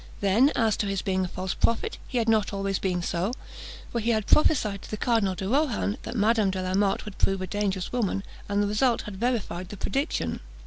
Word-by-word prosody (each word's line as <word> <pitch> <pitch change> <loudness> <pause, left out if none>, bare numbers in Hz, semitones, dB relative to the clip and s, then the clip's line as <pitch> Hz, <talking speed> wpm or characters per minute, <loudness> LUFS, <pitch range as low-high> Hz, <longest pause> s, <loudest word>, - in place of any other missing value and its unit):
Then, 215 +9 +4
as 225 -3 +2
to 205 - -1
his 195 -1 -2
being 185 -1 0
a - - -3
false 185 +1 -3
prophet, 335 - 0
he 255 - -3
had 230 -1 +1
not 220 -2 +3
always 195 -1 -1
been 180 -2 -1
so; 180 +7 -1 0.6
for 235 - -1
he 230 +1 -1
had 215 -3 +1
prophesied 215 -10 +3
to - - -11
the 215 - -3
Cardinal 210 -5 +1
de 190 - -4
Rohan, 245 -4 +1
that 235 - -6
Madame 215 -1 +3
de 190 0 -2
la 185 0 -2
Motte 195 +1 +1
would 210 -2 -9
prove 195 0 +2
a 185 - -3
dangerous 195 -1 -2
woman, 210 -5 -1 0.3
and 205 0 +2
the - - +1
result 230 +3 +2
had 205 -2 -7
verified 205 -6 -2
the 205 - -8
prediction. 275 +9 -1
205 Hz, 225 wpm, -26 LUFS, 190-230 Hz, 0.6 s, Then